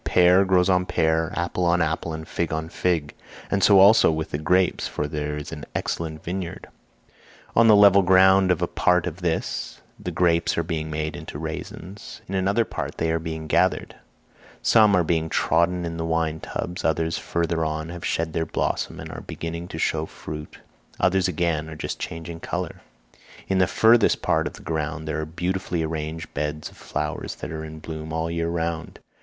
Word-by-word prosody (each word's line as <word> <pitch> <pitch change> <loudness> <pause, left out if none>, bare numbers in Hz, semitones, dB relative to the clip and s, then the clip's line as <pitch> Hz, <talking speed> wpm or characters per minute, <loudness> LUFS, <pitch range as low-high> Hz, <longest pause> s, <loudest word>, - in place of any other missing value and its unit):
Pear 90 +2 +5
grows 90 -1 +3
on 90 -1 +3
pear, 80 0 +1
apple 90 +1 -1
on 85 0 +3
apple, 80 0 -1
and 80 0 -6
fig 85 - -2
on 80 0 -3
fig, 85 -5 -1 0.4
and 100 -1 +1
so 100 - +7
also 100 -1 +7
with 80 0 -3
the 75 - -2
grapes, 90 +3 +2
for 75 - -3
there 75 0 -3
is 75 - -7
an 75 -3 -7
excellent 80 -2 -3
vineyard: 90 0 -5 0.9
on 115 0 +6
the 110 - +8
level 100 -1 +7
ground 95 +1 +5
of 90 - +2
a - - +1
part 90 -1 +2
of 85 -2 -4
this, 80 -8 -2 0.2
the - - -4
grapes 85 -2 +2
are 85 - +1
being 80 -1 -3
made 75 0 -3
into - - -7
raisins; 100 +4 -7
in 95 - -6
another 100 +4 +2
part - - -5
they 80 0 0
are 80 - +1
being 80 -1 -5
gathered; 80 - +1 0.7
some 110 -3 +5
are 90 - +3
being 80 -1 0
trodden 85 +3 +1
in 85 0 -4
the 80 - -2
wine 80 -1 0
tubs, 90 +2 -5
others 80 +1 0
further 85 -1 -1
on 80 0 -3
have 85 0 -8
shed 80 -1 -1
their 80 - 0
blossom - - -2
and - - -7
are - - -7
beginning 85 +1 -6
to 80 - -7
show 80 -1 0
fruit, 75 0 -8 0.4
others 95 0 +3
again 80 -2 -1
are 80 - -7
just 75 - -5
changing 80 0 -6
colour. 90 0 -4 0.7
In 95 -1 +1
the 90 - +4
furthest 115 +3 +4
part - - +2
of - - -7
the - - -13
ground 80 -1 -3
there 80 0 -2
are 80 - -5
beautifully 90 +1 -2
arranged 80 0 -4
beds 75 0 -3
of - - -19
flowers - - -4
that - - -7
are 80 -1 -5
in 80 0 -8
bloom 80 0 -7
all 80 +1 -1
the 85 - -3
year 85 0 -1
round. 85 -1 -3
85 Hz, 195 wpm, -24 LUFS, 80-90 Hz, 0.9 s, the